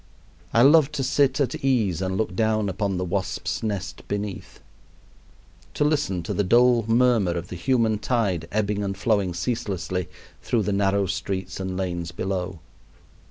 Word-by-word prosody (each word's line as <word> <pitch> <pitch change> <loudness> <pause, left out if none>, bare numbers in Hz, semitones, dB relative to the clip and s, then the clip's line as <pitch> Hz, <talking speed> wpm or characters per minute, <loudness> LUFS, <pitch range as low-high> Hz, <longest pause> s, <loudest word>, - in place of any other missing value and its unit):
I 115 - +5
love 150 +1 +6
to 140 -3 -1
"sit 140 +2 +2
at 135 -2 -1
ease 110 -10 +1
and 95 0 -1
look 105 -4 -2
down 110 -1 +1
upon 100 0 -1
the 90 - -2
wasps' 95 +1 -2
nest 100 -4 -4
beneath;" 100 -1 -5 1.2
to - - +1
listen 145 - 0
to - - -3
the 105 - +1
dull 120 +4 +4
murmur 115 -6 +3
of 85 +1 -5
the - - -6
human 115 +1 +1
tide 105 -8 0
ebbing 105 -1 0
and 100 -1 -3
flowing 100 -4 +1
ceaselessly 90 -4 -2 0.3
through 115 -3 0
the 100 - -1
narrow 100 0 +2
streets 95 0 -4
and 95 -1 -3
lanes 85 -2 -3
below. 90 -1 -3
100 Hz, 160 wpm, -24 LUFS, 95-115 Hz, 1.2 s, love